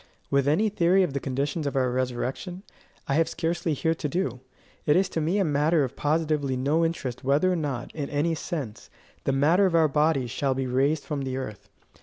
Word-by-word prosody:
With 140 0 +2
any 170 +10 +3
theory 190 -1 +3
of 155 - -2
the 140 - -1
conditions 140 +4 -2
of 140 - -3
our 130 -2 +2
resurrection, 130 +9 -3 0.4
I 140 - 0
have 160 +3 +2
scarcely 170 -1 -1
here 160 +4 +1
to 155 -2 -4
do. 135 -7 -2 0.5
It 150 - +5
is 190 +1 +3
to 160 - -2
me 165 +6 +1
a 200 - +3
matter 150 +1 +2
of 135 0 -4
positively 150 -3 0
no 145 +6 +1
interest 140 -7 -3
whether 145 +7 +3
or - - +1
not, 140 -7 -3
in 145 -3 -4
any 150 +3 0
sense, 150 - -5 0.4
the - - +2
matter 160 +9 +4
of 175 - 0
our 160 -1 +5
bodies 150 -4 +1
shall 135 0 0
be 135 0 -1
raised 140 +4 +1
from 150 -3 -3
the 130 -1 -3
earth. 110 -6 -7
150 Hz, 210 wpm, -26 LUFS, 135-165 Hz, 0.5 s, It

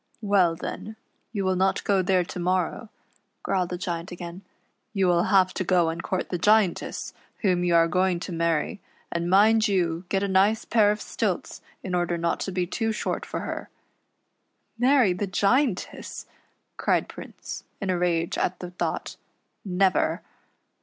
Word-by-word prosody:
"Well, 190 -5 +3
then, 215 +5 -6 0.4
you 200 -4 -2
will 190 0 +2
not 190 +1 +1
go 195 -2 +2
there 185 0 +2
to 175 - -7
morrow," 185 +4 -1 0.5
growled 180 -2 0
the 180 - -3
Giant 175 -1 -4
again. 175 +1 -7 0.5
"You 195 -2 +2
will 175 -1 +3
have 185 -2 +4
to - - -2
go 175 -2 +3
and 165 +1 -4
court 185 +2 -2
the 180 - -2
Giantess, 210 -2 +2 0.3
whom 180 -4 +2
you 175 -1 +2
are 165 0 +5
going 180 +1 +1
to 185 - -5
marr\', 165 +2 0 0.3
and 170 0 -1
mind 215 +4 +5
you 175 -3 0
get 195 0 +1
a - - +1
nice 195 +3 +3
pair 215 -3 +4
of 210 0 -1
stilts - - -3 0.2
in 185 - -4
order 175 -1 0
not 170 0 -1
to 195 - -3
be 180 -1 0
too 225 +5 -1
short 215 - -3
for - - -4
her." - - -5 0.6
" - - -49
Marry 250 -6 +4
the 195 +3 -3
Giantess," 205 +3 0 0.5
cried - - +1
Prince, - - -9 0.2
in 195 -2 -1
a 180 - 0
rage 170 -1 0
at 180 - 0
the 180 -1 -7
thought; 180 - -3 0.3
" - - -50
never." 190 0 +1
185 Hz, 175 wpm, -26 LUFS, 175-200 Hz, 0.6 s, are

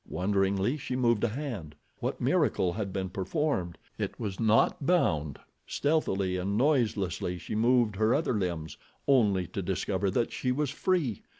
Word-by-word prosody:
Wonderingly 95 - +1
she 130 -2 -4
moved 120 -4 +2
a - - +4
hand. 110 - -5 0.2
What - - -3
miracle 90 -1 +2
had 100 -1 -3
been 95 -1 -3
performed? 95 - -1 0.2
It - - -3
was 100 -5 -4
not 110 +5 +3
bound! 80 - +1 0.3
Stealthily 100 -12 0
and 100 +3 -1
noiselessly 110 - +1
she 85 - -7
moved 115 -2 +3
her 110 +2 +3
other 145 -3 0
limbs, 85 -7 -3 0.3
only 105 -9 +3
to 100 - -4
discover 95 +1 -1
that 115 +5 0
she 125 - -1
was 140 +1 0
free. 155 - 0
105 Hz, 155 wpm, -29 LUFS, 95-125 Hz, 0.3 s, a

